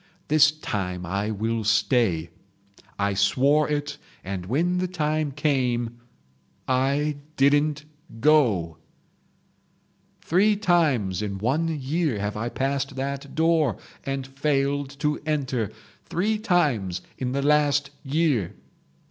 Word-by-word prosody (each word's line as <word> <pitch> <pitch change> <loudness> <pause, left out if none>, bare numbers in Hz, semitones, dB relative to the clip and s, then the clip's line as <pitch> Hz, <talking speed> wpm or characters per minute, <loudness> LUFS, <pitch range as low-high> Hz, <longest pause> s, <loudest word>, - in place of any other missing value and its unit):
This 145 -1 +6
time 95 -12 -4
I 100 +4 -2
will 110 +2 -1
stay..... 105 - +2 0.7
I 100 0 0
swore 135 +11 +3
it 145 -1 -2 0.2
and 95 -1 -5
when 175 - +1
the 185 - 0
time 155 -4 -1
came—I 125 - -2 0.2
didn't 145 +2 +3 0.3
go. 110 - +3 1.4
"Three 205 +5 +3
times 155 - +1
in 100 -2 -3
one 135 +11 0
year 145 -1 -1
have 105 0 -3
I 115 +3 -2
passed 135 +1 -2
that 140 +1 -4
door 160 - +2 0.3
and 135 -1 -3
failed 140 0 0
to 150 -1 0
enter. 135 -8 -1 0.4
Three 210 +5 0
times 135 - +1 0.2
in 125 -1 -2
the 140 0 -1
last 145 -1 +2
year. 140 - 0
135 Hz, 110 wpm, -25 LUFS, 110-150 Hz, 1.4 s, This